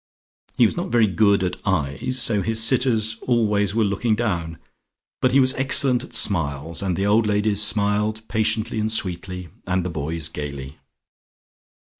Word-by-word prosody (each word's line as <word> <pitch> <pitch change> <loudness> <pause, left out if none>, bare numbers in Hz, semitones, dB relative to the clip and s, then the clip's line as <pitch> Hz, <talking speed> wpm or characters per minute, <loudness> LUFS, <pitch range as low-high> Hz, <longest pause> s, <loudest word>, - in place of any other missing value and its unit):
He - - +5
was - - 0
not - - -4
very 115 -1 +3
good 100 0 +2
at 90 - -2
eyes, 90 - -1
so 110 -4 +1
his 115 +2 -1
sitters 110 -2 +2
always 105 -4 +1
were 115 - +2
looking 105 +3 0
down, 85 -8 -3 0.6
but 130 - +2
he 135 - +4
was 130 -1 +3
excellent 135 -1 +1
at 120 - -8
smiles, 80 -7 +1
and 95 -3 -1
the 95 - -1
old 105 +2 +2
ladies 105 0 +1
smiled 105 +1 +1
patiently 110 +1 0
and 110 +1 0
sweetly, 90 -3 -2 0.2
and 90 -1 -1
the 90 - -3
boys 80 +1 -3
gaily. 70 -3 -7
105 Hz, 160 wpm, -22 LUFS, 90-110 Hz, 0.6 s, He